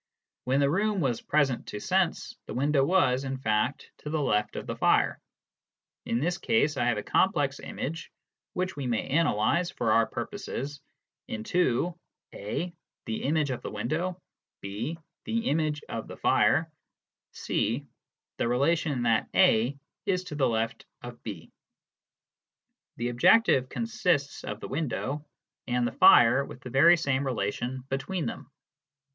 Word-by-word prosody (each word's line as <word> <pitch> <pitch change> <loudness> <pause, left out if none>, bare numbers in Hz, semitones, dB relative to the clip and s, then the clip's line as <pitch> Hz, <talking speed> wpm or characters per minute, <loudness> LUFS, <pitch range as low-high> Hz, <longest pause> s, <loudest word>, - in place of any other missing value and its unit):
When 135 +2 +2
the 140 - +3
room 205 +3 +1
was 130 -8 0
present 140 -5 +1
to 105 - -5
sense, - - 0
the - - -6
window 140 +2 +2
was, 135 -6 +3
in 135 0 -3
fact,, 110 +2 -1
to 150 - -7
the 155 +1 -1
left 105 -7 0
of - - -5
the - - -4
fire. - - +2 0.9
In 115 - +1
this 175 +6 -1
case, 205 -8 +2
I 120 - 0
have 120 -3 +1
a 105 - -3
complex 145 -8 +1
image,, 165 +5 -5 0.4
which 185 +1 -2
we 140 -3 -4
may 115 -3 -1
analyse, 165 +3 +2
for 120 -9 -1
our 115 0 +4
purposes, 145 - -5 0.5
into 130 +7 0 0.4
(a) 160 - -4 0.3
the 110 -1 -3
image 150 -1 +1
of 125 - -4
the - - -5
window, 160 - -2 0.4
(b) 105 +11 -4 0.3
the 230 +1 -1
image 155 -1 0
of - - -5
the - - -9
fire, 160 +1 +3 0.6
(c) 120 +7 -1 0.5
the - - 0
relation 140 +1 +1
that 115 -2 +2
(a) 120 +6 +4 0.3
is 185 -2 +1
to 180 -5 -7
the 140 -2 +2
left 115 0 -2 0.2
of 120 -1 -9
(b). 95 -8 -8 1.5
The 120 +1 -1
objective 130 - +4
consists 180 -11 -1
of 105 +1 -6
the - - -5
window 145 0 -3 0.4
and 125 -1 +1
the 120 - -1
fire 120 +4 +6
with 125 - -10
the 125 - -8
very 165 +7 +6
same 140 -4 0
relation 125 +1 -2
between 155 +6 -2
them. - - -6
135 Hz, 150 wpm, -28 LUFS, 120-165 Hz, 1.5 s, fire